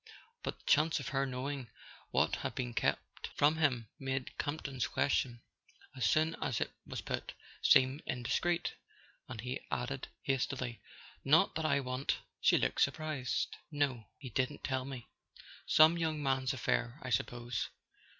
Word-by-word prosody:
But - - -4
the - - -26
chance 155 +1 +4
of 135 - -4
her 135 0 +1
knowing 130 0 -4 0.4
what - - +2
had - - -4
been 125 -2 -2
kept - - -1
from 150 +2 +4
him 130 -8 +2
made 135 -1 -3
Campton's 140 -4 -2
question, 120 -4 0 0.5
as 120 -6 +2
soon 155 +6 +3
as 125 -6 0
it - - -1 0.2
was - - -4
put, - - -4 0.3
seem 130 +3 +5
indiscreet, 170 +8 0 0.6
and 120 -3 -6
he 125 +2 -3
added 130 +2 -2 0.2
hastily: 130 -3 -1 0.4
"Not 160 +7 +5
that 160 0 -2
I 140 -2 +3
want 130 +1 -1
" - - -51
She - - +6
looked - - +1
surprised. 155 -5 0
"No: 140 -7 0
he 130 -4 -8
didn't 130 +6 -1
tell 130 -1 -1
me. 130 -4 -7 0.6
Some 160 +2 +7
young 155 -2 0
man's 135 -1 +1
affair, 120 -1 0
I 130 - -4
suppose. 120 +2 -1
135 Hz, 150 wpm, -34 LUFS, 125-145 Hz, 0.6 s, Some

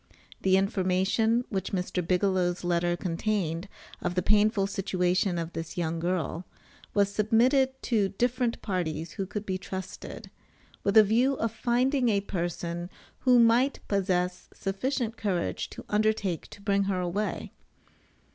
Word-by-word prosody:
The 190 0 +4
information 195 +4 +1
which 195 -1 -3
Mr. 180 -1 -1
Bigelow's 180 0 +1
letter 175 0 +1
contained 180 0 -2 0.3
of 175 0 -2
the 180 - +1
painful 210 -1 +3
situation 185 -2 0
of 170 0 -4
this 165 +1 -6
young 165 -1 -1
girl 175 0 -1 0.5
was 200 -1 +3
submitted 255 +5 +3
to 210 -5 +2
different 245 +3 -1
parties 165 -5 -2
who 195 - -4
could 210 +1 -5
be 185 -1 -2
trusted, 190 0 -7 0.5
with 200 +2 +3
a 215 - +10
view 240 +6 +3
of 230 -3 -1
finding 245 +3 +1
a 205 -2 +3
person 175 -2 -3 0.3
who 250 -2 +5
might 240 +4 +4
possess 180 -2 0
sufficient 230 +4 -2
courage 185 -5 -1
to - - -10
undertake 210 -5 0
to 205 - -13
bring 200 -1 +2
her 190 -2 0
away. 180 +4 -2
195 Hz, 135 wpm, -28 LUFS, 180-220 Hz, 0.5 s, a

